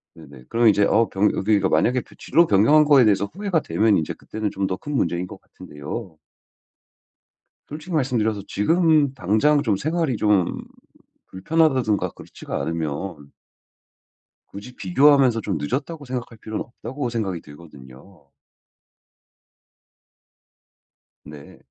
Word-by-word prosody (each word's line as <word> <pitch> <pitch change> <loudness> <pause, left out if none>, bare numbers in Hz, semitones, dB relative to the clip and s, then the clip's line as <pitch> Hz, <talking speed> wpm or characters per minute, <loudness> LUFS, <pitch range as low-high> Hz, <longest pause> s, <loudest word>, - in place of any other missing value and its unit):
네네. 70 -5 -15
그럼 115 0 +2
이제 105 -1 +4
어 110 +3 +3
변 100 +2 +1
여기가 100 -1 +1
만약에 120 +11 +2 0.2
진로 170 0 +2
변경한 145 +10 +4
거에 145 -3 +6
대해서 100 -2 +2
후회가 190 -2 -2
되면 110 -6 +2
이제 80 - -2
그때는 110 -1 -5
좀 95 - -2
더 95 - -2
큰 145 - -7
문제인 85 -6 -1
것 - - -11
같은데요. 80 +5 -9 1.5
솔직히 155 +4 -9
말씀드려서 115 -8 0
지금 155 - +2
당장 135 +7 +2
좀 110 -7 0
생활이 155 - -1
좀 105 -5 +1 0.7
불편하다든가 130 -1 +1
그렇지가 - - -8
않으면 80 -1 -4 1.2
굳이 115 +6 -10
비교하면서 130 +4 +3
좀 100 -5 -3
늦었다고 145 - -4
생각할 125 -3 -6
필요는 110 0 -5
없다고 125 +2 -6
생각이 100 -7 -3
들거든요. 75 +1 -16 3.0
네. 75 -2 -13
110 Hz, 290 characters per minute, -22 LUFS, 95-140 Hz, 3.0 s, 거에